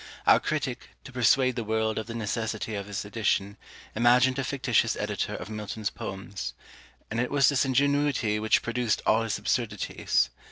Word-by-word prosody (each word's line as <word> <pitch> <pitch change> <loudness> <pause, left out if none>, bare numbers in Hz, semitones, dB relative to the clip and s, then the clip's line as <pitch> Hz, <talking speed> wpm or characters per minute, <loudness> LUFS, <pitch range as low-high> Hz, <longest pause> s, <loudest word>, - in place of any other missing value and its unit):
Our - - +7
critic, 135 -5 -3
to 135 - -11
persuade 130 +1 +3
the 120 - -2
world 110 0 0
of 110 - -6
the 115 - -6
necessity 110 0 -3
of 100 -1 -4
his 100 0 -4
edition, 105 -2 0 0.4
imagined 125 +3 +4
a - - 0
fictitious 135 0 +1
editor - - -2
of - - -7
Milton's 105 0 -4
Poems: 95 0 -6 0.6
and 110 - -1
it 125 - 0
was 140 -3 +4
this 140 -1 +2
ingenuity 140 -4 +1
which 110 0 +2
produced 115 -1 -1
all 110 +1 +4
his 115 -2 -1
absurdities. 105 -1 0
115 Hz, 165 wpm, -27 LUFS, 105-130 Hz, 0.6 s, Our